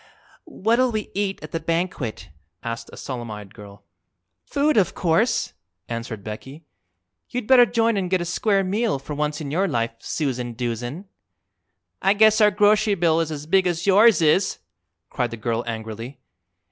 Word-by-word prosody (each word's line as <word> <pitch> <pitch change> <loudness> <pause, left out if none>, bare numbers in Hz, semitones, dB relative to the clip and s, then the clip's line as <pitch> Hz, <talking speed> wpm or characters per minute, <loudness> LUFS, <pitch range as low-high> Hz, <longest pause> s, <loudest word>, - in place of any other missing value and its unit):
"What'll 235 +4 +1
we 215 -1 -4
eat 195 0 -2
at 155 - -8
the 165 - -2
banquet?" 165 - -3 0.3
asked 115 0 -5
a - - -12
solemn 120 -3 -6
eyed 105 -2 -9
girl. 100 -1 -13 0.6
"Food, 290 +1 +1
of 190 -5 +2
course," 190 +8 +1 0.3
answered 115 -3 -5
Becky. 130 +9 -8 0.7
"You'd 250 -2 -3
better 245 0 +7
join 230 0 +1
an' 190 -2 -1
get 185 0 +1
a 175 - -3
square 195 +3 +1
meal, 205 -1 0
for 135 +2 -7
once 150 +1 -2
in 140 -2 -5
your 190 +6 +1
life, 115 -7 -1
Susan 125 -5 -3
Doozen." 120 - -4 1.0
"I 195 +2 +3
guess 220 +1 +5
our 210 - +7
grocery 210 +1 +3
bill 165 -3 +2
is 165 -1 -1
as 150 -1 -6
big 185 +3 +3
as 175 -1 -2
yours 200 -2 +5
is!" 170 +5 +3 0.5
cried 125 -2 -1
the 115 - -7
girl 115 +2 -2
angrily. 115 +3 -6
165 Hz, 165 wpm, -23 LUFS, -, 1.0 s, better